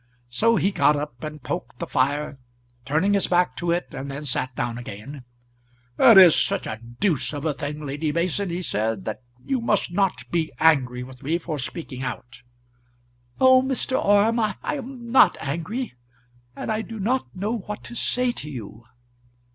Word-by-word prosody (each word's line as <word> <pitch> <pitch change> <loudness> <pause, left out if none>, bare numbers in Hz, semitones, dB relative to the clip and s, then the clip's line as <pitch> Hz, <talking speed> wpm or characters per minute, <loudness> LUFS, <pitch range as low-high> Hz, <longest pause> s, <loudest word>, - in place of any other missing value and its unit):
So 230 - +3
he 200 -2 +2
got 150 -5 +3
up 145 -4 -5
and 150 -3 -7
poked 125 -9 -5
the - - -4
fire, 140 +1 0 0.5
turning 160 +8 +2
his 200 - +3
back 180 0 +2
to 175 - -2
it, 175 +1 -1
and 135 +1 -5
then 140 +2 -6
sat 130 -1 -1
down 120 -1 -2
again. 125 +4 -9 0.7
"It 225 - +8
is 180 -4 +9
such 195 -1 +1
a 110 - -5 0.2
deuce 165 -7 +1
of 145 +1 -5
a 155 - +1
thing, 145 +2 -5
Lady 145 +2 -2
Mason," 180 +4 -1
he 175 +2 -3
said, 110 - -1
"that 110 +3 -4 0.2
you 265 -3 0
must 210 -6 +1
not 195 0 0
be 165 -2 0
angry 130 -6 +3
with 130 0 -12
me 160 +5 0
for 160 -3 -5
speaking 135 -1 -6
out." 120 -2 -6 1.0
"Oh, 260 0 +7
Mr. 260 0 0
Orme, 205 +3 +4
I 215 -2 +1
am 260 -4 -5
not 265 - +6
angry, 170 - -4 0.6
and - - -4
I 215 0 0
do 220 0 -8
not 245 +4 -1
know 210 +5 -2
what 210 +2 -7
to 240 - -9
say 250 +1 +1
to 150 -10 -8
you." 115 -4 -9
165 Hz, 180 wpm, -24 LUFS, 135-210 Hz, 1.0 s, is